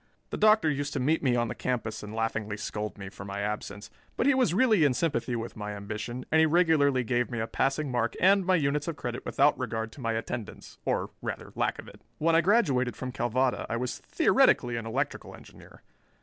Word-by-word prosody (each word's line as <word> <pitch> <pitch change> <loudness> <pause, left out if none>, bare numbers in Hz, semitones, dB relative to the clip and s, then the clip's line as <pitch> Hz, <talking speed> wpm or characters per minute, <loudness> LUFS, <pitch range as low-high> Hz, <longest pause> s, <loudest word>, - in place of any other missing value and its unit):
The - - -3
Doctor 215 -5 +5
used 145 -1 -1
to 140 - -1
meet 155 +6 +1
me 125 -4 +2
on 120 -1 +1
the - - -4
campus 115 -4 -3
and 105 - -8
laughingly 110 -2 -2
scold 105 0 -5
me 95 -1 -7
for 100 +1 -10
my 100 0 -5
absence, 105 0 -5 0.3
but - - +1
he 280 - +5
was 255 -9 +2
really 215 -2 +4
in 140 -4 +3
sympathy 125 -6 -1
with 115 0 -5
my 105 -1 -5
ambition 105 +5 -6
and 160 - +5
he 160 - +5
regularly 155 -6 +3
gave 120 +1 0
me 120 -3 -4
a 110 - 0
passing 135 +4 -1
mark 120 -1 0
and 195 +1 +5
my 185 +1 +3
units 145 -1 0
of 165 - -2
credit 120 -2 -5
without 145 +2 +3
regard 115 -3 -3
to 140 - -12
my 115 -1 -1
attendance, 115 0 -6
or, - - -1
rather, - - -5
lack - - -1
of - - -10
it. - - -14 0.2
When 165 +1 +2
I 165 - +6
graduated 145 - +2
from 130 -1 -5
Calvada 125 +2 0
I 115 - -1
was 125 +1 -3
theoretically 120 -1 +3
an 115 -1 -4
electrical 135 +6 -3
engineer. - - -16
125 Hz, 220 wpm, -28 LUFS, 115-155 Hz, 0.3 s, I